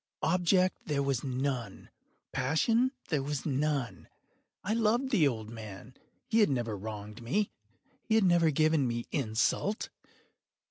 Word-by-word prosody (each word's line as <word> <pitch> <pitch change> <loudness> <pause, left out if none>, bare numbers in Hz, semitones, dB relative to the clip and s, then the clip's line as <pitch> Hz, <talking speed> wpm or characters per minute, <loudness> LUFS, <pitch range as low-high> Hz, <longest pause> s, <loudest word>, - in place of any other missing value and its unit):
Object 180 +2 +3
there 145 -2 0
was 135 -3 0
none. 130 -5 -3 0.4
Passion 225 - +2 0.2
there 150 -4 +1
was 140 0 -3
none. 135 - -1 0.6
I 210 - 0
loved 230 +4 +1
the 175 - +4
old 110 -4 -3
man. 110 +1 -9 0.3
He 230 - +2
had 210 - +5
never 120 -5 -1
wronged 105 +2 -7
me. 195 - 0 0.5
He 220 - 0
had 220 - +5
never 175 -3 +4
given 155 -2 +2
me 120 0 -2
insult. 135 - 0
140 Hz, 135 wpm, -30 LUFS, 120-185 Hz, 0.6 s, had